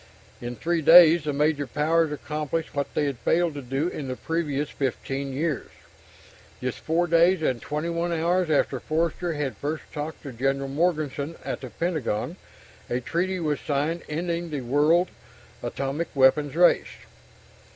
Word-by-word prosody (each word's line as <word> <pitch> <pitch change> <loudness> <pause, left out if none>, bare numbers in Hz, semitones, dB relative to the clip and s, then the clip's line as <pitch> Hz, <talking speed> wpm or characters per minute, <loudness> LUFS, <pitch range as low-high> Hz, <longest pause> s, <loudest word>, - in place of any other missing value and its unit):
In 120 0 -5
three 170 +5 0
days, 165 0 +8
the 150 - 0
major 145 0 +1
powers 155 +4 +1
accomplished 150 +2 -3
what 140 -1 -2
they 150 - +2
had 140 -4 -3
failed 170 -1 +2
to 145 - -6
do 135 +5 -1
in 150 -6 -5
the 130 - -3
previous 150 -2 -2
15 135 0 -3
years. 150 +2 -2 0.9
Just 125 -1 -3
4 165 +2 +1
days 170 +1 +4
and 125 -5 0
21 170 +3 -2
hours 170 +1 +1
after 140 -3 +1
Forster 165 +3 -1
had 145 -3 -3
first 150 +2 -3
talked 155 +1 -5
to 140 - -6
General 135 +3 -1
Morganson 155 -1 -1
at - - -4
the - - -7
Pentagon, 155 -11 -2 0.5
a 120 - 0
treaty 180 +8 -1
was 150 -3 -1
signed 150 +4 -1
ending 170 +2 -2
the 145 -3 -3
world 150 +8 +3 0.5
atomic 135 +6 -3
weapons 140 +2 +4
race. 175 +1 +4
150 Hz, 150 wpm, -25 LUFS, 140-170 Hz, 0.9 s, days